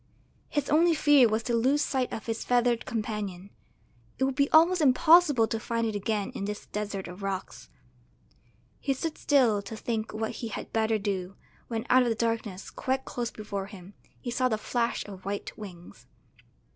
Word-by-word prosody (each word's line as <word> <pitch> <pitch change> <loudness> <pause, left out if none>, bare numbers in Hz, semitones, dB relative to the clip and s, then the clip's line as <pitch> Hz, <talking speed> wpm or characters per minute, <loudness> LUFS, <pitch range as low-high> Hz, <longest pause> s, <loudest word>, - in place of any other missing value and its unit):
His 290 -2 -1
only 330 +2 +4
fear 290 -5 +5
was 220 +1 0
to 240 - -2
lose 265 +6 +3
sight 260 -4 -1
of 220 - -5
his 225 -1 -3
feathered 245 -1 +1
companion; 210 -5 -4 0.7
it - - 0
would 270 0 +1
be 280 +2 +2
almost 335 +3 +5
impossible 295 -3 +5
to 225 - -2
find 230 +1 -1
it 220 - -1
again 205 0 -2
in 200 - -4
this 210 0 -5
desert 205 -2 -4
of 180 +3 -9
rocks. 195 - -5 1.1
He 275 -1 -1
stood 315 +4 -3
still 245 -8 +3
to 220 +2 -8
think 220 0 -3
what 220 0 -3
he 230 - -5
had 220 - -7
better 220 0 +2
do, 195 -2 -3 0.3
when 225 0 -3
out 255 - +6
of 245 - +2
the 225 - 0
darkness, 220 -4 -2
quite 265 +1 -2
close 240 -1 -3
before 200 -4 -5
him, 195 -1 -12 0.3
he 245 - -5
saw 255 +1 +1
the 220 - 0
flash 235 +2 -1
of 195 -2 -10
white 200 +1 -4
wings. 180 -5 -11
225 Hz, 185 wpm, -28 LUFS, 205-255 Hz, 1.1 s, out